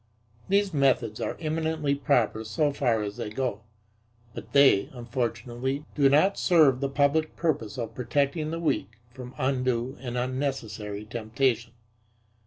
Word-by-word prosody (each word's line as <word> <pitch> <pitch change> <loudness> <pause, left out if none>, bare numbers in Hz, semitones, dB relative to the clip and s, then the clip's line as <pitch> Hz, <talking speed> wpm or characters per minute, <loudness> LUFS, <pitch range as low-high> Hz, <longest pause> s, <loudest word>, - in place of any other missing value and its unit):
These 200 -1 +2
methods 130 -6 +1
are - - -3
eminently 160 -2 -1
proper 120 -5 +1
so 115 +7 0
far 120 -6 +1
as 100 0 -5
they - - -4
go, 110 -1 -3 0.7
but - - -9
they, 140 -8 +5
unfortunately, 120 +3 -3
do 140 -2 +4
not 155 +8 +3
serve 155 -8 +4
the 140 0 -1
public 145 +3 +1
purpose 135 -9 -1
of 115 -2 -4
protecting 140 +6 -1
the 165 +1 -3
weak 115 - -1
from 125 0 -10
undue 130 -1 -1
and 125 -2 -4
unnecessary 125 -5 -3
temptation. 115 +1 -1
130 Hz, 135 wpm, -27 LUFS, 115-145 Hz, 0.7 s, they